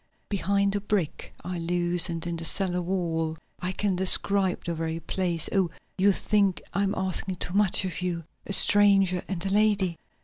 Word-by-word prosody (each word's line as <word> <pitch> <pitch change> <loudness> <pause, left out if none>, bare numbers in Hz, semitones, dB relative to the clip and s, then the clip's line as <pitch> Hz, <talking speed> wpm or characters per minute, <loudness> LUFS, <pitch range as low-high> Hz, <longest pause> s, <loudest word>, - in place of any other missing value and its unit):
"Behind 200 0 0
a 205 - -2
brick 200 -6 -3
I 180 0 -5
loosened 175 0 0
in 170 -1 -3
the 165 - 0
cellar 180 +1 +2
wall. 165 -3 -2 0.2
I 180 +1 -3
can 195 0 -1
describe 190 +1 +2
the 170 - -2
very 165 0 -4
place. 170 -1 -1
Oh, 190 -4 +1 0.3
you 200 +2 +3
think 200 -2 0
I 200 - 0
am 200 0 -1
asking 190 0 +1
too 175 - -5
much 200 -1 +2
of 180 -1 -5
you 175 -2 -3 0.2
a - - -5
stranger 195 -3 +5
and 185 -2 -4
a - - -1
lady." 200 -4 +1
185 Hz, 175 wpm, -26 LUFS, 175-200 Hz, 0.3 s, stranger